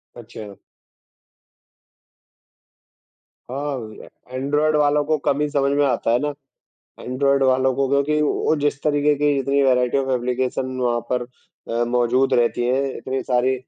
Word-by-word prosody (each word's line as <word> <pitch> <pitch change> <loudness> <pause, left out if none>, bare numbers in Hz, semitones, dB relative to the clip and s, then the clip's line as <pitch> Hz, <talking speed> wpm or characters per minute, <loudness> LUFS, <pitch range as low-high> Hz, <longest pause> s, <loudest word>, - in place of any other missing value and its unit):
अच्छा। 110 -3 -10 3.0
हाँ, 130 -6 -5 0.3
ऐन्ड्रॉइड 145 +4 +1
वालों 150 0 +2
को 155 +1 +1
कम 140 - +1
ही 150 - +1
समझ 140 -1 +1
में 145 - +3
आता 120 -3 0
है 120 - +3
ना, 145 +1 -2 0.7
ऐन्ड्रॉइड 140 +2 +1
वालों 130 0 +2
को, 135 0 +1
क्योंकि 140 +2 +1
वो 150 +1 +1
जिस 145 -1 -1
तरीके 150 -1 +2
की 145 0 +1
जितनी 140 +1 +1
वैरायटी 125 -1 +2
ऑफ़ 135 -1 -1
एप्लीकेशन 130 +1 -2
वहाँ 120 -1 +1
पर 125 -1 +1 0.5
अ, 115 +1 0
मौजूद 125 +2 +1
रहती 120 0 +1
हैं, 130 +3 +1
इतनी 130 0 -3
सारी 125 0 +1
135 Hz, 140 wpm, -21 LUFS, 125-145 Hz, 3.0 s, में